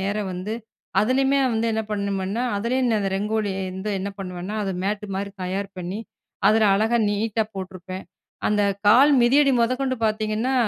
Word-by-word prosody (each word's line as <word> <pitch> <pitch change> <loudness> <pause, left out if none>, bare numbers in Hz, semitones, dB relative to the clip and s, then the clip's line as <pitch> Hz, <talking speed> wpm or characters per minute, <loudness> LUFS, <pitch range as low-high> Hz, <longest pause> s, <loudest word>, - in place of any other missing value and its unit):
நேர 200 +2 -1 0.2
வந்து 185 +5 -4 0.5
அதிலேயுமே 265 +5 +2
வந்து 225 +1 0
என்ன 220 0 0
பண்ணுமேன்னா, 200 +2 -1
அதுலேயும் 245 +4 0
நான் 220 -2 +2
அந்த 195 -1 -1
ரங்கோலி 210 +1 -1 0.2
வந்து 190 +3 -4
என்ன 195 +2 -3
பண்ணுவேன்னா, 180 +1 -5
அத 195 - -2
மேட்டு 210 +1 -2
மாரி 200 0 -3
தயார் 195 +2 -2
பண்ணி 180 +4 -4 0.5
அதில 220 +1 +4
அழகா 220 +4 +2
நீட்டா 220 +2 0
போட்டிருப்பேன். 185 0 -7 0.4
அந்த 210 -1 +2 0.2
கால் 255 +8 +7
மிதியடி 275 +3 +5
முதக்கொண்டு 255 +2 +1
பார்த்தீங்கன்னா, 215 +3 0
210 Hz, 150 wpm, -23 LUFS, 195-230 Hz, 0.5 s, கால்